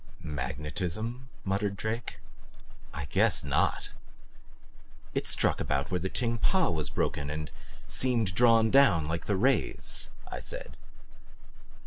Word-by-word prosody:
"Magnetism?" 90 - -4 0.2
muttered 100 +1 -1
Drake. 110 +3 -4 0.7
"I 75 - -5
guess - - +3
NOT!" - - 0 1.2
"It - - -1
struck - - +2
about 70 +1 -1
where 90 - +1
the 95 +3 -2
Ting 115 0 -1
Pa 185 - +2
was 80 -3 0
broken 70 0 -1
and 75 +1 -4 0.3
seemed 115 -7 +1
drawn 115 +1 +5
down 105 - +5
like 80 +1 -3
the 100 - +2
rays," 130 +7 +1 0.2
I - - -5
said. - - -7
100 Hz, 120 wpm, -29 LUFS, 80-115 Hz, 1.2 s, drawn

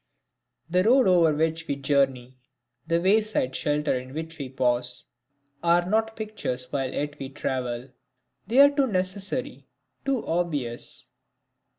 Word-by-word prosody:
The 180 +2 +2
road 250 +3 +5
over 175 -3 +5
which 160 +2 -1
we 140 - -1
journey, 135 -2 0 0.5
the 165 +1 +2
wayside 195 -7 +2
shelter 150 0 0
in 130 +2 -6
which 160 0 -6
we 135 -2 -5
pause, 125 -1 0 0.6
are 175 +1 +3
not 220 +2 +1
pictures 130 - -4
while 135 -2 -1
yet 145 +1 -4
we 135 - -5
travel 130 -3 -3 0.6
they 250 +5 +5
are 285 0 +8
too 280 -2 +2
necessary, 195 +6 -2 0.4
too 270 -3 -1
obvious. 150 -9 -2
160 Hz, 130 wpm, -26 LUFS, 130-195 Hz, 0.6 s, are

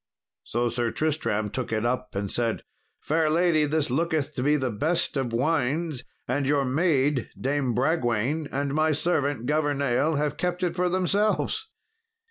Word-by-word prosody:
So 120 +1 -1
Sir 120 0 -1
Tristram 115 -9 -1
took 130 -1 -3
it 110 +1 0
up, 125 -1 -2
and 100 -1 -2
said, 115 -2 -1 0.4
"Fair 155 0 +1
lady, 160 -1 +3
this 150 -2 0
looketh 155 0 0
to 130 - -3
be 145 +3 +3
the 130 -4 0
best 155 +13 0
of 130 -4 -1
wines, 145 +2 0 0.2
and 135 +2 0
your 140 -1 +2
maid, 140 -2 +1
Dame 135 -3 0
Bragwaine, 135 +1 0
and 140 0 -1
my 155 +1 +2
servant, 145 -5 0
Governale, 145 0 +1
have 150 0 -1
kept 180 +1 -2
it 175 - 0
for 180 0 +1
themselves." 205 - 0
145 Hz, 155 wpm, -26 LUFS, 125-160 Hz, 0.4 s, lady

